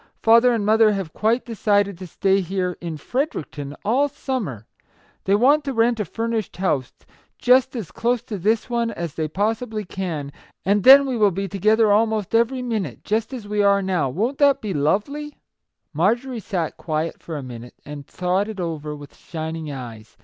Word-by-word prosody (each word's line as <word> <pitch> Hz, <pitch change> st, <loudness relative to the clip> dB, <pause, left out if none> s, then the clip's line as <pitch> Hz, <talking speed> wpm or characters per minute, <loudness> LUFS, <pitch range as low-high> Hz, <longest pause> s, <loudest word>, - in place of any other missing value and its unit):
" -, -, -53 dB
Father 230 Hz, +2 st, +6 dB
and 225 Hz, -4 st, 0 dB
mother 220 Hz, 0 st, +5 dB
have 195 Hz, -5 st, -4 dB
quite 225 Hz, +3 st, +1 dB
decided 205 Hz, -3 st, +1 dB
to 185 Hz, -, -7 dB
stay 195 Hz, +3 st, +1 dB
here, 180 Hz, 0 st, -2 dB
in 165 Hz, -2 st, -5 dB
Fredericton, 150 Hz, -, -4 dB
all 265 Hz, +7 st, +2 dB
summer! 245 Hz, -, -4 dB, 0.6 s
They 195 Hz, -, +3 dB
want 280 Hz, +7 st, +4 dB
to 275 Hz, -, -2 dB
rent 230 Hz, 0 st, +2 dB
a 210 Hz, -, -1 dB
furnished 225 Hz, +3 st, -3 dB
house, 150 Hz, -9 st, 0 dB, 0.5 s
just 255 Hz, +1 st, +3 dB
as 220 Hz, -9 st, -5 dB
close 240 Hz, 0 st, 0 dB
to 210 Hz, -5 st, -6 dB
this 215 Hz, +5 st, +1 dB
one 235 Hz, -1 st, 0 dB
as 170 Hz, -8 st, -5 dB
they 160 Hz, -1 st, -2 dB
possibly 215 Hz, +4 st, -2 dB
can; 165 Hz, -7 st, -4 dB, 0.3 s
and 200 Hz, +1 st, +2 dB
then 275 Hz, +2 st, +9 dB
we 260 Hz, -3 st, -2 dB
will 210 Hz, -2 st, +4 dB
be 195 Hz, +2 st, -3 dB
together 215 Hz, +3 st, +3 dB
almost 215 Hz, -1 st, +1 dB
every 240 Hz, +3 st, +2 dB
minute, 215 Hz, -, -3 dB
just 220 Hz, +3 st, -1 dB
as 240 Hz, -6 st, -7 dB
we 210 Hz, 0 st, 0 dB
are 200 Hz, -1 st, +3 dB
now. 180 Hz, -7 st, 0 dB
Wont 230 Hz, -, -2 dB
it 280 Hz, -1 st, +5 dB
be 210 Hz, -5 st, -4 dB
lovely? 215 Hz, -, -1 dB, 0.3 s
" -, -, -57 dB
Marjorie 235 Hz, -, 0 dB
sat 175 Hz, -6 st, -3 dB
quiet 155 Hz, 0 st, -3 dB
for 160 Hz, -2 st, -6 dB
a 140 Hz, -, -6 dB
minute, 120 Hz, -1 st, -9 dB
and 145 Hz, -1 st, -8 dB
thought 185 Hz, +3 st, -1 dB
it 215 Hz, -3 st, -7 dB
over 155 Hz, -4 st, -4 dB
with 145 Hz, -1 st, -12 dB
shining 160 Hz, -1 st, -6 dB
eyes. 115 Hz, -5 st, -9 dB
205 Hz, 185 wpm, -22 LUFS, 165-230 Hz, 0.6 s, then